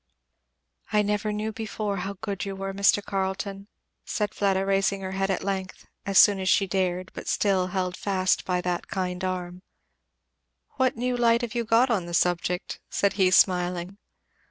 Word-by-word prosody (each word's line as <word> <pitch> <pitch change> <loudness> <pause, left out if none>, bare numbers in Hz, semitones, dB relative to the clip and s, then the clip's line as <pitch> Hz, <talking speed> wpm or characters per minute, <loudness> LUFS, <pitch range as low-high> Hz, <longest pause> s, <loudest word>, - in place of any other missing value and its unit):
"I 210 -1 +3
never 210 +1 -1
knew 210 +1 -2
before 215 -2 -4
how 195 +2 -3
good 200 -3 -3
you 195 -1 -4
were, 195 0 -4
Mr. 200 +1 +3
Carleton," 195 0 -3 0.4
said 210 -1 -2
Fleda 195 -1 +1
raising 195 0 +1
her 190 0 -4
head 195 0 -1
at 190 - -1
length, 190 -1 -4 0.2
as 195 -1 +1
soon 200 -2 +7
as 190 0 -1
she 200 - +4
dared, 185 -1 -1
but - - -8
still 190 -3 +1
held 185 -1 -2
fast 185 -2 0
by 180 -1 -1
that 180 -1 -2
kind 185 -1 -3
arm. 180 -1 -4 1.2
"What 260 -3 +1
new 250 +1 -1
light 235 -1 +3
have 235 - -3
you 235 -1 -1
got 230 +3 +3
on 190 -6 0
the 170 - -2
subject?" 180 +1 0
said 200 - +1
he, 190 -2 +3
smiling. 180 +1 +2
195 Hz, 175 wpm, -26 LUFS, 185-205 Hz, 1.2 s, soon